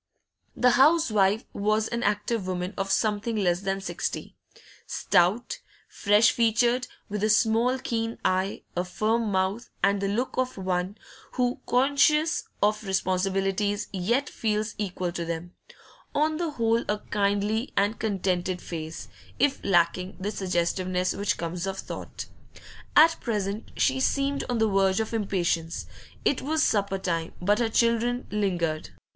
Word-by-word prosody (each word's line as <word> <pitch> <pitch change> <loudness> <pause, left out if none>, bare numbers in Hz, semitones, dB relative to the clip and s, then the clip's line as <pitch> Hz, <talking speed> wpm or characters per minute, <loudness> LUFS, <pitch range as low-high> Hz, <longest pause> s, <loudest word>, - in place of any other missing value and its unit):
The 250 0 +4
housewife 240 - +4
was 215 +2 +1
an 235 0 -3
active 210 -1 0
woman 180 +1 -3
of 195 0 -2
something 215 +2 0
less 180 -4 +1
than 195 0 -2
sixty; - - -4 0.5
stout, 190 +6 +1 0.3
fresh 210 +2 +4
featured, 235 +2 +2 0.2
with 210 0 -3
a 215 - +3
small 230 +3 +3
keen 230 -2 -3
eye, 185 +1 0
a 175 - 0
firm 215 +4 0
mouth, 190 +5 -1
and 200 0 +3
the 200 - 0
look 230 +6 -2
of 255 -2 -1
one 185 +1 -2 0.4
who, 250 -1 0
conscious 285 +6 +3 0.2
of 210 +1 +2
responsibilities, 195 +2 0
yet 235 +9 0
feels 215 0 -1
equal 185 -3 -2
to 170 -1 -4
them; 170 +1 -5 0.6
on 310 +1 +2
the 340 -1 -1
whole 230 -4 +1
a 210 - +1
kindly 205 +4 0
and 205 +2 +1
contented 185 -3 -1
face, 160 -2 -6 0.3
if 280 +1 +1
lacking 180 0 +1
the 200 +3 -2
suggestiveness 185 -1 0
which 200 +1 -1
comes 170 +2 -3
of 195 0 -3
thought. - - -7 0.7
At 325 +2 +7
present 210 -2 -2
she 265 0 +2
seemed 275 +1 0
on 245 - 0
the 220 0 +3
verge 195 -1 +2
of 220 +1 -2
impatience; 175 -6 -1 0.4
it 280 - +2
was 310 +3 +1
supper 200 -2 +1
time, 170 -3 -2
but 205 +4 +2
her 235 -2 +1
children 235 +2 +1
lingered. 175 -7 -1
205 Hz, 140 wpm, -26 LUFS, 185-235 Hz, 0.7 s, At